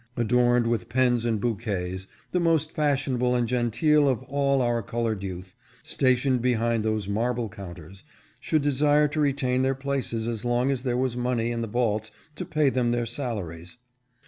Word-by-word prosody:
491 120 - 0 0.3
adorned 120 -1 +2
with 115 -6 -2
pens 120 -2 +2
and 115 -2 0
bouquets, 100 -5 -3 0.2
the 180 - +1
most 165 -2 +1
fashionable 135 -4 +1
and 120 -1 +1
genteel 125 +5 +2
of 130 -1 -1
all 140 0 +1
our 120 -1 +1
colored 115 -1 -2
youth, 95 -1 -7 0.3
stationed 130 -1 +1
behind 115 -2 +1
those 110 -2 -1
marble 115 +3 -1
counters, 95 -1 -11 0.4
should 155 -2 0
desire 145 +1 +3
to 150 +2 -4
retain 135 -3 +1
their 135 0 +1
places 135 -4 -3
as 115 -3 -3
long 120 +2 +1
as 135 -3 -2
there 125 -2 -1
was 130 -1 0
money 120 -1 -1
in 115 0 -2
the 115 - -2
vaults 110 -1 -1 0.3
to - - -5
pay 150 -3 +2
them 125 -2 +1
their 120 0 0
salaries. 110 - -5
120 Hz, 170 wpm, -26 LUFS, 110-135 Hz, 0.4 s, desire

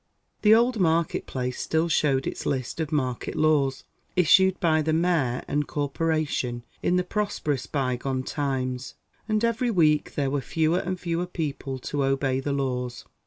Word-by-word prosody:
The 215 +1 +7
old 240 0 +2
market 165 -2 +1
place 125 -1 -3
still 160 +1 +1
showed 140 -4 +2
its - - -4
list 130 +3 -2
of 160 -1 -2
market 130 -5 -1
law's, 145 -4 +2 0.3
issued 190 +2 +5
by 160 -4 +3
the 155 +1 0
Mayor 160 -7 +1
and 145 0 -1
Corporation 145 -4 -1 0.2
in 180 - +1
the 180 - +2
prosperous 180 - -2
bygone 130 -1 -1
times; 130 -3 -3 0.3
and 215 +1 +2
every 235 +2 0
week 155 -8 +2
there 140 -2 0
were 145 -1 0
fewer 160 +5 +1
and 185 0 -3
fewer 175 0 -2
people 145 -6 -4
to 140 +2 -2
obey 135 -1 +1
the 140 +2 -2
laws. 125 -3 -2
150 Hz, 160 wpm, -26 LUFS, 135-170 Hz, 0.3 s, The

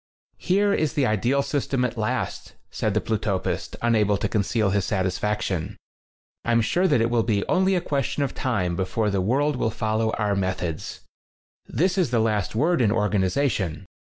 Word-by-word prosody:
"Here 200 +2 +2
is 155 -2 0
the 140 - +1
ideal 120 +6 +1
system 135 -3 -1
at 120 - -3
last," 110 -2 -3 0.2
said 105 -2 -1
the 110 - +2
Plutopist, 105 -3 -2
unable 105 -3 +3
to - - -1
conceal 105 -1 0
his 100 -1 +1
satisfaction. 95 -2 -1 0.7
"I'm 115 0 +2
sure 180 +11 +2
that 145 -9 +3
it 115 +1 +1
will 120 -1 +3
be 105 -3 0
only 190 +1 +2
a 180 - +1
question 140 -2 -1
of 135 - -2
time 95 -9 -1
before 105 +4 -1
the 100 -1 0
world 135 +8 +1
will 115 - 0
follow 110 0 -1
our 105 -2 0
methods. 90 -4 -3 0.7
This 185 +3 +1
is 175 -8 +2
the 120 - +1
last 110 -3 0
word 160 +6 +2
in 110 -3 +3
organization. 105 - 0
110 Hz, 170 wpm, -24 LUFS, 100-140 Hz, 0.7 s, unable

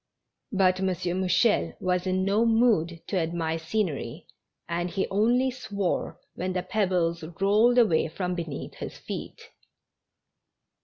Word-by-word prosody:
But 185 -3 +3
M. 190 - 0
Mouchel 185 +4 +1
was 180 0 0
in 185 0 +1
no 205 +3 +3
mood 225 -8 +2
to 195 - -2
admire 165 -1 -1
scenery, 160 -2 -3 0.4
and 175 +1 -2
he 190 +2 -1
only 240 +6 +2
swore 200 -8 -3
when 185 +1 -3
the 180 -1 -1
pebbles 180 -6 0 0.2
rolled 215 +5 +4
away 210 -12 +4
from 180 +3 -3
beneath 165 -5 -5
his - - -7
feet. - - -7
185 Hz, 125 wpm, -27 LUFS, 170-210 Hz, 0.4 s, rolled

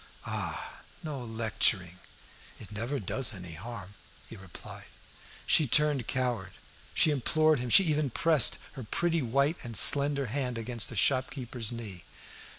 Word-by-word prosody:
"Ah! - - -6 0.2
no 145 -5 -6
lecturing." 110 -5 -1 0.6
"It - - -12
never 120 +7 -4
does 115 +3 -2
any 90 -3 -9
harm," 100 +2 -9 0.3
he - - -11
replied. 95 -3 -12 0.6
She 155 - +3
turned 145 -1 +2
coward; 125 -7 -3 0.4
she 155 - +4
implored 155 +2 +1
him; 125 0 -5
she 195 - +7
even 155 -4 -1
pressed 155 +1 +1
her 135 -4 -9
pretty 165 +8 -1
white 140 +6 0
and 115 -3 -3
slender 140 +2 +7
hand 125 0 -4
against 115 -1 -2
the 115 - -8
shopkeeper's 125 -1 -1
knee. 105 -7 -8
125 Hz, 140 wpm, -28 LUFS, 110-145 Hz, 0.6 s, she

